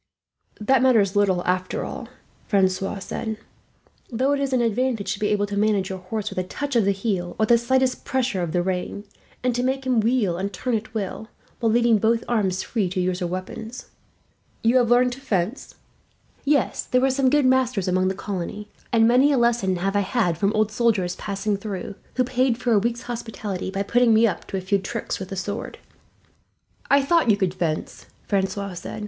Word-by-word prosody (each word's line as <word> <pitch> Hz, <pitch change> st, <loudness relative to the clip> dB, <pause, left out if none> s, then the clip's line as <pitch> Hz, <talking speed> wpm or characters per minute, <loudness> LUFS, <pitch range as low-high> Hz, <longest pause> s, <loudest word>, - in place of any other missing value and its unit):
"That 240 Hz, +4 st, +3 dB
matters 220 Hz, -7 st, +3 dB
little, 190 Hz, -3 st, +2 dB
after 185 Hz, 0 st, -1 dB
all," 245 Hz, -, -7 dB, 0.4 s
Francois 195 Hz, 0 st, +1 dB
said; 220 Hz, +3 st, -4 dB, 0.7 s
"though 260 Hz, +4 st, +1 dB
it 285 Hz, -, +1 dB
is 275 Hz, -1 st, -1 dB
an 255 Hz, -, +2 dB
advantage 235 Hz, -1 st, 0 dB
to -, -, -7 dB
be 210 Hz, -, +1 dB
able 205 Hz, -1 st, +1 dB
to 205 Hz, 0 st, -5 dB
manage 205 Hz, -2 st, +1 dB
your 190 Hz, -, -5 dB
horse 210 Hz, +3 st, -4 dB
with -, -, -3 dB
a -, -, 0 dB
touch 280 Hz, +9 st, -4 dB
of 230 Hz, -4 st, +4 dB
the 200 Hz, -, +3 dB
heel, 195 Hz, -3 st, -2 dB
or 220 Hz, -, +3 dB
the 235 Hz, -, +5 dB
slightest 260 Hz, +2 st, +1 dB
pressure 255 Hz, -8 st, -1 dB
of 170 Hz, -2 st, -2 dB
the 175 Hz, +1 st, +1 dB
rein, 190 Hz, +2 st, -3 dB, 0.4 s
and 250 Hz, -1 st, +1 dB
to 245 Hz, -, -1 dB
make 265 Hz, +1 st, -1 dB
him 255 Hz, -3 st, +2 dB
wheel 220 Hz, -6 st, +1 dB
and 200 Hz, +1 st, -2 dB
turn 245 Hz, +6 st, -3 dB
at 220 Hz, 0 st, -3 dB
will, 215 Hz, +1 st, -4 dB, 0.3 s
while 230 Hz, -2 st, +2 dB
leaving 235 Hz, -1 st, +4 dB
both 225 Hz, +2 st, +2 dB
arms 195 Hz, -6 st, 0 dB
free 210 Hz, -6 st, -1 dB
to 185 Hz, -, -3 dB
use 180 Hz, 0 st, 0 dB
your 175 Hz, -2 st, -2 dB
weapons. 220 Hz, +7 st, -7 dB, 0.7 s
You 230 Hz, +3 st, +4 dB
have 240 Hz, -2 st, +3 dB
learned 245 Hz, +1 st, +4 dB
to 260 Hz, +2 st, -8 dB
fence?" 215 Hz, -1 st, -2 dB, 0.7 s
"Yes. 285 Hz, -3 st, +1 dB
There 250 Hz, -, +2 dB
were 265 Hz, 0 st, +3 dB
some 265 Hz, 0 st, +2 dB
good 295 Hz, 0 st, +3 dB
masters 255 Hz, -6 st, +2 dB
among 185 Hz, +1 st, +2 dB
the 190 Hz, -, -1 dB
colony, 205 Hz, +2 st, -5 dB, 0.2 s
and 225 Hz, -1 st, +5 dB
many 255 Hz, +5 st, +5 dB
a 280 Hz, -, +3 dB
lesson 235 Hz, -6 st, +2 dB
have 195 Hz, +3 st, -1 dB
I -, -, +4 dB
had 200 Hz, -3 st, +1 dB
from 200 Hz, +5 st, +1 dB
old 215 Hz, 0 st, +1 dB
soldiers 210 Hz, -6 st, +1 dB
passing 200 Hz, 0 st, -2 dB
through, 195 Hz, -3 st, -5 dB, 0.2 s
who 255 Hz, -, +3 dB
paid 255 Hz, -1 st, +1 dB
for 245 Hz, -1 st, -1 dB
a 215 Hz, -, +5 dB
week's 235 Hz, +3 st, -2 dB
hospitality 220 Hz, -6 st, -5 dB
by 195 Hz, +1 st, -2 dB
putting 235 Hz, +2 st, +3 dB
me 225 Hz, +2 st, +5 dB
up 205 Hz, -, -2 dB
to 195 Hz, -, -3 dB
a -, -, -3 dB
few 195 Hz, +2 st, +1 dB
tricks 195 Hz, -, -4 dB
with 190 Hz, -, -6 dB
the 195 Hz, -, -5 dB
sword." 200 Hz, +2 st, -4 dB, 1.1 s
"I 280 Hz, 0 st, +5 dB
thought 330 Hz, -2 st, +3 dB
you 205 Hz, -, +5 dB
could 190 Hz, -3 st, 0 dB
fence," 160 Hz, -4 st, -3 dB, 0.2 s
Francois 195 Hz, 0 st, -1 dB
said. 175 Hz, +4 st, -7 dB
215 Hz, 205 wpm, -23 LUFS, 190-245 Hz, 1.1 s, the